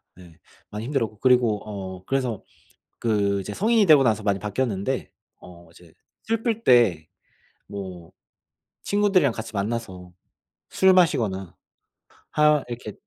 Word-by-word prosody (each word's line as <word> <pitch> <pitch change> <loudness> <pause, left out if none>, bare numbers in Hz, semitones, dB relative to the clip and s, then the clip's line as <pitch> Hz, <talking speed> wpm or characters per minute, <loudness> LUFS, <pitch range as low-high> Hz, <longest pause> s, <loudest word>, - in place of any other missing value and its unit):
네 85 -3 -17 0.3
많이 105 +2 -6
힘들었고. 115 -6 -2
그리고 120 -5 +3
어 95 -3 -7
그래서 130 -4 -2 0.6
그 100 -3 0
이제 100 +2 -6
성인이 220 - +2
되고 150 -6 +6
나서 110 -3 +1
많이 100 -2 0
바뀌었는데 105 +2 -3 0.3
어 85 -2 -15
이제 85 -1 -19 0.3
슬플 225 0 -2
때 110 -11 +4 0.6
뭐 95 -4 -8 0.7
친구들이랑 200 - +2
같이 115 0 -7
만나서 100 -4 -4 0.6
술 190 0 +4
마시거나 110 - +1 0.8
하 150 -2 +3
이렇게 120 -3 -7
110 Hz, 260 characters per minute, -24 LUFS, 95-135 Hz, 0.8 s, 되고